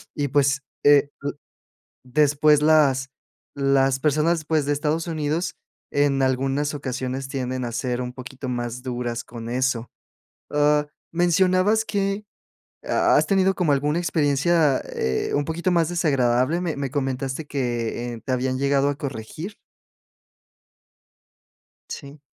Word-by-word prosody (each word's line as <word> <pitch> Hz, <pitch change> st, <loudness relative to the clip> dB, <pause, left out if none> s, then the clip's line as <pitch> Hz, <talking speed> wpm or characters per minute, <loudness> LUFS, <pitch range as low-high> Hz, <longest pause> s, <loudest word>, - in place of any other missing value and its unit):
y, 145 Hz, -2 st, 0 dB
pues, 140 Hz, -1 st, +2 dB, 0.2 s
eh 145 Hz, 0 st, +6 dB
l 145 Hz, -, -2 dB, 0.7 s
después 150 Hz, +2 st, +3 dB
las 140 Hz, -4 st, +4 dB, 0.5 s
las 135 Hz, -1 st, +2 dB
personas, 155 Hz, +2 st, +1 dB
pues 155 Hz, -2 st, +1 dB
de 145 Hz, -, +1 dB
Estados 155 Hz, +3 st, -1 dB
Unidos 160 Hz, +1 st, -2 dB, 0.4 s
en 145 Hz, -1 st, +2 dB
algunas 135 Hz, +3 st, 0 dB
ocasiones 130 Hz, -1 st, -4 dB
tienden 130 Hz, -1 st, -3 dB
a 120 Hz, -, -4 dB
ser 125 Hz, 0 st, -2 dB
un 125 Hz, 0 st, -4 dB
poquito 130 Hz, 0 st, -7 dB
más 120 Hz, 0 st, -3 dB
duras 120 Hz, -2 st, -3 dB
con 115 Hz, -1 st, -9 dB
eso. 125 Hz, -1 st, -1 dB, 0.6 s
Ah, 150 Hz, 0 st, +3 dB, 0.3 s
mencionabas 185 Hz, +5 st, +3 dB
que 200 Hz, 0 st, -1 dB, 0.6 s
ha -, -, +3 dB
has -, -, +3 dB
tenido 190 Hz, -1 st, +3 dB
como 165 Hz, -6 st, +1 dB
alguna 145 Hz, +4 st, +1 dB
experiencia, 155 Hz, -2 st, +2 dB
eh, 65 Hz, 0 st, -1 dB
un 145 Hz, -, +1 dB
poquito 170 Hz, +3 st, -1 dB
más 165 Hz, -2 st, +2 dB
desagradable. 140 Hz, -2 st, +2 dB
Me 170 Hz, -4 st, -2 dB
me 140 Hz, -1 st, -3 dB
comentaste 135 Hz, +1 st, -2 dB
que, 120 Hz, -3 st, -2 dB
eh, 115 Hz, -, -10 dB
¿te 130 Hz, -, -2 dB
habían 130 Hz, 0 st, 0 dB
llegado 140 Hz, +1 st, +2 dB
a 145 Hz, -, -4 dB
corregir? 140 Hz, -, -6 dB, 2.3 s
¿Sí? 140 Hz, +1 st, -8 dB
140 Hz, 130 wpm, -23 LUFS, 130-155 Hz, 2.3 s, eh